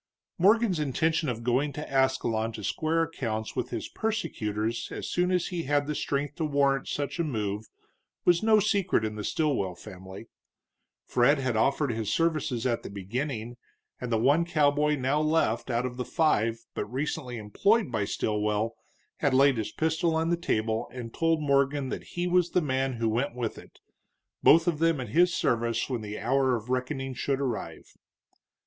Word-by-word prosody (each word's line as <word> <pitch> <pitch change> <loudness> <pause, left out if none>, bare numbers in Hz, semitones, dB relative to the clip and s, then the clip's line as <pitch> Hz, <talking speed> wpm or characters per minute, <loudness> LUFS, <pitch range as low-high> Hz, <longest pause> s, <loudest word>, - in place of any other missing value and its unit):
Morgan's 205 -1 +4
intention 155 +2 0
of 115 -1 -4
going 130 +5 +1
to 150 - -6
Ascalon 130 -4 +1
to 105 - -7
square 160 - 0
accounts 115 -9 -4
with - - -2
his - - -4
persecutors 115 - -2
as - - -5
soon 180 0 +1
as 180 -2 +1
he 175 -2 -3
had 145 +1 +1
the 150 - -2
strength 145 0 -2
to 165 - -1
warrant 140 -2 +1
such 145 +2 -3
a - - +2
move 105 -7 -3 0.6
was 175 -1 +4
no 220 -1 +5
secret 200 - +1
in 110 - -3
the 105 0 -6
Stilwell 130 - 0
family. 95 +1 -10 0.8
Fred 125 +5 +3
had 130 -3 -1
offered 135 +5 +2
his 110 -2 -2
services 155 -7 0
at 120 -2 0
the - - -8
beginning, 115 +4 -4 0.4
and 125 -1 -5
the 115 - +3
one 140 +9 +3
cowboy 150 -2 +2
now 140 +2 0
left 155 -7 +1
out 120 0 0
of 125 -1 -5
the 125 - -2
five 115 -8 +1
but - - -3
recently 130 -2 -3
employed 200 - +1
by 110 -4 0
Stilwell 105 +2 -1 0.4
had 140 -3 +1
laid 135 -1 +5
his 110 - -3
pistol 160 +1 0
on 165 +1 +1
the - - +4
table 110 -9 -1
and 120 -3 -7
told 165 -1 +1
Morgan 140 -1 +2
that - - -4
he 175 - 0
was 180 -1 +2
the 180 - +2
man 135 -1 0
who 115 -1 -1
went 120 +3 -1
with 120 -3 -3
it, - - -16 0.6
both 165 +2 +6
of 165 -4 +1
them 165 -2 +2
at 125 -4 -5
his 175 +9 +4
service 115 -7 0
when 120 -3 -2
the 105 0 -6
hour 130 +2 +2
of 115 +1 -6
reckoning 130 +1 -2
should 135 +2 -1
arrive. 130 -5 -4
135 Hz, 180 wpm, -28 LUFS, 115-160 Hz, 0.8 s, both